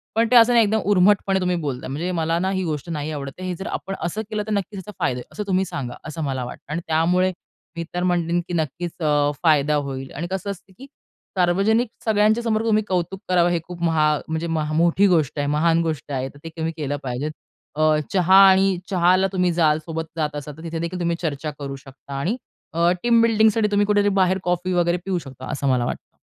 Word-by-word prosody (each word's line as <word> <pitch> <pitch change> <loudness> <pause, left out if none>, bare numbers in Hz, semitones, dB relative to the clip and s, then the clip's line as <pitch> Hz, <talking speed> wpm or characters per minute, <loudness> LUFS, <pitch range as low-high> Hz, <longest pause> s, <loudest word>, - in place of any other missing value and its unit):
पण 230 +1 +3
ते 250 - +5
असं 235 +1 +7
नाही 235 -1 +6
एकदम 220 +2 +1
उर्मटपणे 195 0 +3
तुम्ही 180 -1 0
बोलताय. 140 -7 -4
म्हणजे 165 +7 -3
मला 165 -1 0
ना 190 +2 0
ही 190 -1 -1
गोष्ट 155 -1 -4
नाही 155 -1 -3
आवडत. 140 -2 -5
हे 185 -1 -3
जर 190 - -7
आपण 195 - -4
असं 190 +6 -2
केलं 215 -1 -2
तर - - -3
नक्कीच 200 0 -2
ह्याचा 190 +3 -9
फायदा 125 - 0
आहे. 125 - -7
असं 210 - -4
तुम्ही 190 0 +1
सांगा 125 -8 -5
असं 155 +1 -5
मला 130 -3 -2
वाटतं. 125 +3 -10
आणि 170 - -2
त्यामुळे 175 +4 +2 0.5
मी 170 - -2
तर 180 0 -1
म्हणेल, 175 -1 +1
की - - -5
नक्कीच 170 +1 -2
अ, 145 -1 +3
फायदा 150 -2 +3
होईल 135 -2 -4
आणि 165 +5 -4
कसं 190 +1 -2
असतं, 190 0 -12
की 270 - -11 0.5
सार्वजनिक 200 +7 +2 0.2
सगळ्यांच्या 215 +1 +3
समोर 220 -1 0
तुम्ही 215 -1 +2
कौतुक 180 +1 -2
करावं 175 -1 +4
हे 170 -1 +1
खूप 180 -1 -9
महा 160 -2 +3 0.2
म्हणजे 160 +1 -2
मोठी 165 +4 +2
गोष्ट 160 -5 +1
आहे. 145 - 0
महान 165 +3 +2
गोष्ट 155 -3 -4
आहे. 130 0 -2
तर 145 - -17
ते 165 - -6
तुम्ही 160 0 -2
केलं 145 -2 -2
पाहिजे. 130 +3 -3 0.5
अ, 155 0 +3 0.2
चहा 185 0 +4
आणि 190 0 +3
चहाला 185 0 +3
तुम्ही 180 -1 +2
जाल, 155 -3 +3
सोबत 160 -1 -4
जात 150 -2 -1
असाल, 145 0 -7
तर 160 - -11
तिथेदेखील 170 +2 -4
तुम्ही 170 -1 0
चर्चा 155 -2 -3
करू 140 -1 -5
शकता 135 +1 -12
आणि 195 - -1 0.4
अ, 170 +1 +3
टीम 235 -1 +4
बिल्डिंगसाठी 220 -1 +3
तुम्ही 205 0 +3
कुठेतरी 205 -1 +3
बाहेर 185 +1 +3
कॉफी 180 +1 -1
वगैरे 175 0 +2
पिऊ 190 -2 0
शकता, 130 -4 -10
असं 140 0 -2
मला 125 -2 +2
वाटतं. - - -6
170 Hz, 215 wpm, -22 LUFS, 150-190 Hz, 0.5 s, असं